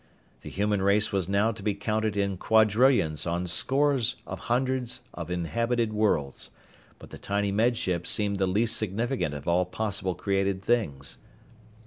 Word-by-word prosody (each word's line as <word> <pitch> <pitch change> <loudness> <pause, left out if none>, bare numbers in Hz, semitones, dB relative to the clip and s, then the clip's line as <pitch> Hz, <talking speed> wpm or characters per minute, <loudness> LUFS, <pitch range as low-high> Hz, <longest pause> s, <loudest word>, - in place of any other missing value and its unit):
The - - -8
human 105 0 0
race 100 +2 +2
was 95 -3 -1
now 100 +3 +2
to 105 -2 -8
be 105 0 -1
counted 110 0 -1
in 100 -1 0
quadrillions 110 - +3
on 85 +1 -1
scores 135 +6 +1
of - - -6
hundreds 125 0 0
of 85 -1 -7
inhabited 115 +7 -1
worlds, 90 -11 0 0.5
but - - -14
the - - -9
tiny 100 0 -1
Med 115 +4 +2
Ship 90 -4 -2
seemed 100 -2 0
the 95 - +2
least 110 +5 +2
significant 110 - -2
of 70 - -8
all 85 +1 +3
possible 95 -1 -3
created 95 -1 -1
things. 95 - -1
100 Hz, 155 wpm, -27 LUFS, 95-115 Hz, 0.5 s, quadrillions